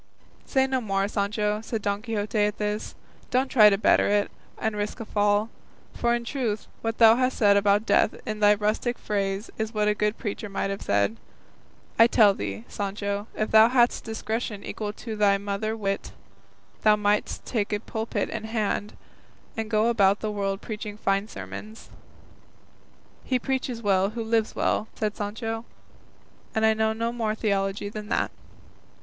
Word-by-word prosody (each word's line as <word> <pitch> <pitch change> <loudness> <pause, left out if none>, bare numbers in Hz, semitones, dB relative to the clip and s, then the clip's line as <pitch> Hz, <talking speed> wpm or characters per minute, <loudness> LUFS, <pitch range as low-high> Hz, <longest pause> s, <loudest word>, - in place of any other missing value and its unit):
"Say 265 -1 +3
no 260 -1 -1
more, 195 -3 0
Sancho," 210 +1 -1
said 225 -1 -4
Don 200 0 -1
Quixote 215 -2 -2
at 210 0 +1
this; 210 0 -3 0.3
"don't 260 +1 +1
try 215 -4 +7
to 195 - +2
better 215 - +4
it, 205 0 +1 0.3
and 220 -1 -2
risk 205 0 -3
a 225 - -5
fall; 205 +1 +1 0.4
for 235 0 +1
in 235 0 -4
truth 230 -5 -2 0.2
what 225 0 -2
thou 225 0 +7
hast 255 0 +1
said 205 -2 +5
about 200 +1 +3
death - - +3
in 215 -1 -4
thy 210 0 +6
rustic 215 +4 -1
phrase 200 0 -2
is 220 +1 -3
what 210 0 +2
a 210 - +4
good 210 +1 -1
preacher 210 -2 -4
might 195 0 -2
have 195 - -5
said. 100 +2 +1 0.8
I 230 - +9
tell 215 -4 +5
thee, 100 - -5
Sancho, 200 +1 -3
if 215 - -2
thou 220 +1 +7
hadst 245 -1 +3
discretion 220 -2 -4
equal 210 -1 -4
to 225 0 -6
thy 205 -1 +4
mother 205 +2 -3
wit, 195 -2 -3 0.7
thou 215 -1 +5
mightst 210 0 0
take 215 -4 -1
a 210 - 0
pulpit 220 +1 -3
in 220 -1 -4
hand, 215 -2 -2 0.6
and 220 -1 -3
go 215 0 +2
about 200 -4 +3
the 215 - -2
world 195 -1 -2
preaching 210 -1 -6
fine 195 0 0
sermons." 215 0 -9 1.3
"He 255 - +1
preaches 255 -2 -3
well 195 -1 +3
who 230 +1 -4
lives 225 -1 0
well," 215 - 0
said 210 -1 -2
Sancho, 225 +2 -4 0.9
"and 220 0 +3
I 220 - +5
know 220 0 +1
no 230 +1 -2
more 220 -3 -1
theology 200 -2 -1
than 210 0 -7
that." - - 0
210 Hz, 170 wpm, -26 LUFS, 205-225 Hz, 1.3 s, I